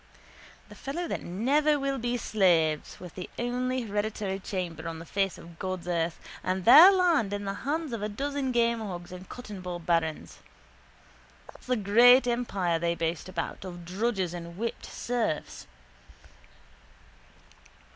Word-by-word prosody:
The - - -11
fellows 335 +5 -5
that - - -3
never 285 - +1
will 275 -1 -1
be 240 +1 -1
slaves, 170 -9 +1
with 180 -2 -10
the 180 - -7
only 250 +2 -1
hereditary 205 -2 -2
chamber 175 -4 -4
on 165 -1 -5
the 165 - -9
face 195 +1 -1
of 170 -1 -13
God's 185 -2 -4
earth 170 -1 -1 0.2
and 185 0 -1
their 315 +11 +10
land 345 - +2
in 205 0 -3
the 195 - -2 0.2
hands 310 -3 -1
of 230 - -3
a 210 - -2
dozen 275 +4 -2
gamehogs 225 -8 -1
and 180 0 -10
cottonball 190 -7 -6
barons. 165 -2 -1 1.1
That's - - -18
the 250 - +2
great 240 +5 +6
empire 200 -9 0
they 170 0 0
boast 165 +2 -3
about 185 - -4
of 175 -2 -8
drudges 190 -1 -1
and 170 0 -8
whipped 230 +2 -4
serfs. 230 -10 -3
200 Hz, 145 wpm, -28 LUFS, 175-245 Hz, 1.1 s, their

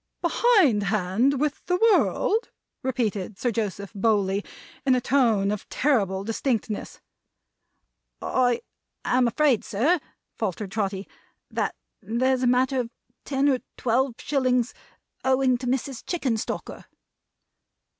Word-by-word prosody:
"Behind 375 - +4
hand 215 +7 +1
with 295 0 -1
the 360 - +2
world!" 450 +1 +2 0.3
repeated 215 -6 -2
Sir 245 +3 0
Joseph 200 -3 -3
Bowley, 200 -1 +1 0.4
in 260 -2 +4
a - - +2
tone 230 -7 +2
of 210 - -5
terrible 200 -9 +1
distinctness. 225 -1 -2 1.2
"I 245 -2 +1 0.4
am 250 -1 +3
afraid, 265 -1 +2
sir," 290 - +1 0.4
faltered 195 +1 -3
Trotty, 195 -2 -2 0.4
"that - - -1 0.3
there's 250 +5 +1
a 255 - +2
matter 255 +2 +2
of 240 -2 -2 0.4
ten 275 0 +1
or 265 -3 +3 0.2
twelve 250 +1 +1
shillings 255 -4 +1 0.5
owing 260 -1 +3
to 250 - -5
Mrs. 260 0 -2
Chickenstalker." 260 -11 -3
245 Hz, 115 wpm, -25 LUFS, 210-270 Hz, 1.2 s, Behind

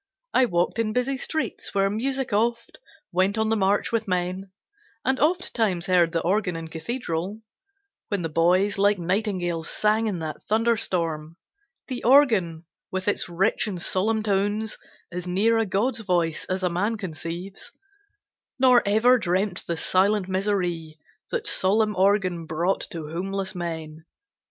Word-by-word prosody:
I 260 - +5
walked 175 +3 0
in 215 -1 0
busy 250 +3 0
streets 315 -1 -3
where 195 0 +3
music 260 +4 -2
oft 235 +3 0 0.3
Went 190 +4 +1
on 220 0 +1
the 225 - +2
march 200 0 +1
with 225 -1 -1
men; 185 +1 -2 0.6
and 265 +2 +1
ofttimes 230 - +1
heard 175 -3 +3
The 165 - 0
organ 185 0 0
in 165 -1 -6
cathedral, 185 +2 -4 0.6
when 200 -4 -2
the - - 0
boys 180 +6 +2
Like 205 +1 +4
nightingales 180 -3 -1
sang 215 +1 +1
in 200 -4 -2
that 160 -2 -5
thunderstorm; 175 -8 0 0.5
The 255 -2 -5
organ, 220 - +4 0.2
with 190 0 -4
its 205 - +1
rich 190 +6 +1
and 190 -4 -4
solemn 215 +5 0
tones 205 +1 0 0.3
As 180 0 -5
near 215 +6 +2
a 225 - 0
God's 220 +7 0
voice 175 -6 0
as 185 0 -3
a - - +3
man 205 +6 0
conceives; 175 0 -6 0.9
Nor 250 -2 +6
ever 240 +5 +5
dreamt 185 0 -1
the 170 - -2
silent 190 +3 +2
misery 180 -5 -1 0.3
That 470 -2 -2
solemn 210 - +2
organ 185 -3 +1
brought 170 +5 -1
to 165 -6 -6
homeless 190 +2 -2
men. 160 -3 -6
195 Hz, 145 wpm, -25 LUFS, 175-220 Hz, 0.9 s, Nor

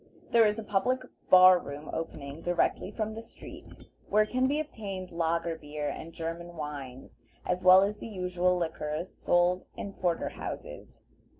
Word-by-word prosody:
There 230 -2 +6
is 210 +1 0
a 225 - -4
public 230 +6 0 0.3
bar 185 0 +9
room 145 0 -8
opening 150 -2 -5
directly 175 +2 0
from 215 +1 -3
the 225 - -6
street, 230 - -13 0.2
where 215 +1 +4
can 255 +4 +1
be 290 +3 +1
obtained 200 -11 -6
lager 165 0 0
beer 150 -1 -5
and 165 - -7
German 170 +1 -6
wines, 140 -5 -7 0.2
as 180 0 -1
well 185 +1 +8
as 210 +1 -2
the - - -7
usual 180 -3 0
liquors 160 0 -3
sold 175 +1 +1
in 200 - -5
porter 175 -3 -1
houses. - - -8
180 Hz, 160 wpm, -29 LUFS, 165-205 Hz, 0.3 s, bar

